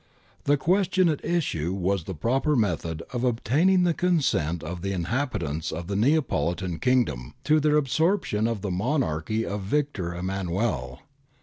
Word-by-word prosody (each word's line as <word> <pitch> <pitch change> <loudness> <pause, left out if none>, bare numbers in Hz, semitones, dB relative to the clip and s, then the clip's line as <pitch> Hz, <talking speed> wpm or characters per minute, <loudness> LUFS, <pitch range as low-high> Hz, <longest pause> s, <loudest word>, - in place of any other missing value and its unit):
The 145 +1 +4
question 185 +3 +2
at 150 - -2
issue 115 - -1
was 95 -2 -1
the 95 - -5
proper 135 - +1
method 85 - -1
of 125 -1 -2
obtaining 145 - +3
the 175 -1 +3
consent 135 - +1
of 85 +2 -5
the 100 +1 -2
in 90 -3 -2
habitants 95 - -2
of 85 +1 -5
the 100 +3 -3
Neapolitan 100 - +1
Kingdom 125 - 0
to 155 0 +4
their 150 0 +3
absorption 145 - +1
in 115 -4 -2
the 100 -2 -3
Monarchy 110 - -1
of 100 0 -3
Victor 100 -6 -1
Emmanuel. 90 - -2
110 Hz, 150 wpm, -26 LUFS, 85-145 Hz, -, The